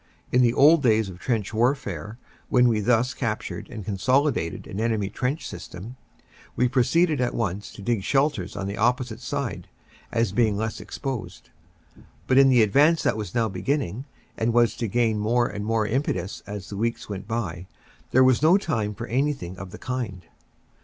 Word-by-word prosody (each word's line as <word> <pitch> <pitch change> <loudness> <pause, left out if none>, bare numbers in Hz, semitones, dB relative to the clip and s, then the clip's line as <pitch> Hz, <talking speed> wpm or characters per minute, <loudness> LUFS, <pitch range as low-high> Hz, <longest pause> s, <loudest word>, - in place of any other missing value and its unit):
In 125 - +4
the 120 -1 +3
old 155 +3 +6
days 110 -5 +3
of 90 -1 -10
trench 110 -3 -2
warfare, 110 - -1 0.3
when 125 -1 +5
we 115 -3 +2
thus 120 +4 +2
captured 115 -5 -4
and 110 -7 -7
consolidated 125 - 0
an 95 - -6
enemy 110 -3 0
trench 135 +5 -2
system, 100 +8 -9 0.6
we 125 - +3
pro 125 +1 +2
ceeded 160 +5 +2
at 125 -1 0
once 100 -2 -3
to 100 - -10
dig 115 -1 0
shelters 135 - 0
on 100 -1 -4
the 100 +1 -4
opposite 120 0 0
side, 130 -4 -4 0.4
as 115 -4 +1
being 110 -1 +2
less 110 0 -3
exposed. 115 -10 -6 0.7
But 130 +1 +4
in 135 0 +7
the 125 -3 +5
advance 145 +10 +4
that - - +2
was 110 +2 -6
now 115 -2 +2
beginning 105 - -2 0.3
and 115 +1 0
was 120 -1 +3
to 115 - -2
gain 110 0 +1
more 120 +3 +2
and 105 -3 -4
more 110 0 +1
impetus 105 -7 -2
as 100 -4 -7
the 100 - -5
weeks 115 +2 -2
went 100 -2 -6
by, 95 -6 -3 0.4
there 130 - +5
was 130 -1 +4
no 165 +5 +6
time 110 - -2
for 115 - -5
anything 130 -7 -1
of 95 - -7
the 105 - -10
kind. 115 -9 -4
115 Hz, 180 wpm, -25 LUFS, 105-130 Hz, 0.7 s, in